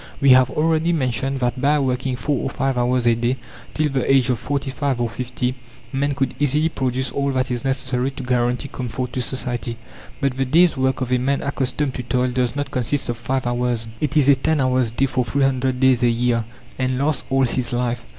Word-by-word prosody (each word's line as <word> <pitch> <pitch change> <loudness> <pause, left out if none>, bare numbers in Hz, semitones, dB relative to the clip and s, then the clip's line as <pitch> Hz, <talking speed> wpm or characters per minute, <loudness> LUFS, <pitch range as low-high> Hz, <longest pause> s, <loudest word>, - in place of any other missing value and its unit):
We 140 - +4
have 130 0 +6
already 160 +3 +1
mentioned 135 -2 -1
that 125 +1 -1
by 145 +3 +3
working 130 -1 -1
4 140 +4 -1
or - - -2
5 135 0 -1
hours 125 0 +1
a 120 - +5
day 120 +3 0 0.4
till 155 0 +2
the 135 -1 0
age 130 -1 +4
of 120 - -1
forty 135 +1 -2
five 135 -2 -1
or 120 - +1
fifty, 125 +2 -3 0.4
man 140 +1 0
could 135 -1 -1
easily 150 +3 +2
produce 130 -3 -2
all 140 0 -1
that 130 0 0
is 120 0 -2
necessary 130 -1 -1
to 135 -1 -8
guarantee 125 +1 0
comfort 125 -1 -5
to 130 - -1
society. 120 -1 -3 0.4
But 135 -3 -1
the 135 - +1
day's 165 +6 +4
work 130 -1 0
of 130 -1 -2
a 125 - +3
man 140 +3 0
accustomed 140 0 -1
to - - -4
toil 125 +1 0
does 125 0 0
not 145 -1 -3
consist 125 +2 -1
of 120 - -2
5 130 +1 -2
hours; 120 -1 -1
it 150 +1 0
is 140 -3 +4
a 140 - +8
10 145 +3 0
hours' 130 -2 +2
day 120 +4 +1
for 130 -1 0
300 130 -1 0
days 130 -2 +4
a 120 - +4
year, 115 -1 +1 0.3
and 130 0 0
lasts 140 +1 0
all 135 0 +2
his 125 -1 -1
life. 120 -1 -2
130 Hz, 220 wpm, -21 LUFS, 125-135 Hz, 0.4 s, a